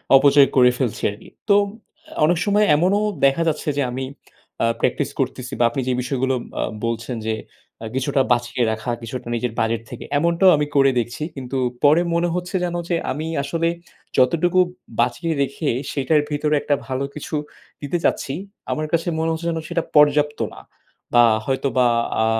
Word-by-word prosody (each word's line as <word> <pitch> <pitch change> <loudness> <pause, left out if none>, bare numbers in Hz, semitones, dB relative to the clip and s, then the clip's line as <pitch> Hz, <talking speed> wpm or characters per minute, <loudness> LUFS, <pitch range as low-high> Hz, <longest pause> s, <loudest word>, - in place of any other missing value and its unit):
অপচয় 140 0 +6
করে 125 -2 +6
ফেলছি 125 -5 -2
আরকি। 105 +2 -13 0.2
তো, 200 - +6 0.7
অনেক 175 +2 +2
সময় 210 +1 +3
এমনও 185 +6 +2 0.3
দেখা 135 +4 +3
যাচ্ছে 155 -1 -1
যে - - +2
আমি 130 +2 -4 0.6
আ - - +4
প্র্যাকটিস - - 0
করতেছি 125 +1 -3
বা - - +4
আপনি 125 +3 -3
যে 130 - +2
বিষয়গুলো 130 +1 0 0.3
আ - - +1 0.2
বলছেন 115 +2 -3
যে 110 - +1 0.6
কিছুটা 135 +1 +1
বাঁচিয়ে 120 0 +1
রাখা, 110 +3 -3
কিছুটা 120 +2 -6
নিজের 120 0 -2
বাজেট 115 0 0
থেকে, - - -8
এমনটাও 170 +4 +4
আমি 150 - +1
করে 135 -1 +5
দেখছি, 120 +5 -4
কিন্তু 135 -1 -4 0.3
পরে 150 +4 +6
মনে 170 +1 +2
হচ্ছে 180 +1 -4
যেন 175 -1 -2
যে 175 - +2 0.2
আমি 155 +4 -4 0.2
আসলে 165 +4 -1 0.5
যতটুকু 170 +7 +3 0.4
বাঁচিয়ে 125 +8 +1
রেখে 140 +2 -1 0.2
সেটার 150 +2 +2
ভিতরে 150 0 +1 0.3
ভালো 130 0 -2
কিছু 150 +1 -5 0.5
দিতে 145 +4 -1
চাচ্ছি, 135 - 0 0.4
আমার 155 - -1
কাছে 170 +1 +1
মনে 160 0 0
হচ্ছে 165 +1 -3
যেন 165 -1 -2
সেটা 170 -1 0
পর্যাপ্ত 150 0 +4
না। - - -11 0.5
বা 120 - +7 0.2
হয়তোবা 130 -2 +1 0.4
আ - - +2
140 Hz, 165 wpm, -21 LUFS, 125-165 Hz, 0.7 s, বা